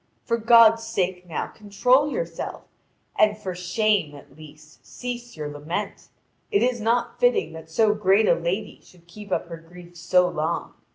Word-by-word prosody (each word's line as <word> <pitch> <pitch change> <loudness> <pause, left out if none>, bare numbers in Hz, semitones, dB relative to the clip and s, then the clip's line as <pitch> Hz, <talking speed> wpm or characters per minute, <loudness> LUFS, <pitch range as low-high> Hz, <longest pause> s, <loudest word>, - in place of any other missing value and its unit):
For 230 - 0
God's 230 -1 +6
sake 185 -5 -2
now 165 - -3
control 250 +8 +1
yourself, - - -5 0.6
and 210 0 +4
for 195 -4 -5
shame, 180 -2 0
at 140 -1 -15
least, 155 0 -16
cease 240 -4 -7
your 150 -1 -4
lament. 150 +8 -5 0.4
It 405 - +2
is 245 -2 0
not 235 +2 0
fitting 245 -10 +2
that 160 0 -11
so 210 +6 +3
great 205 +1 +3
a - - +5
lady 180 +5 -3
should 175 -2 -21
keep 200 +3 -12
up - - 0
her 165 - -7
grief 175 +1 -15
so 180 +2 +2
long. 160 0 -3
195 Hz, 165 wpm, -24 LUFS, 170-225 Hz, 0.6 s, God's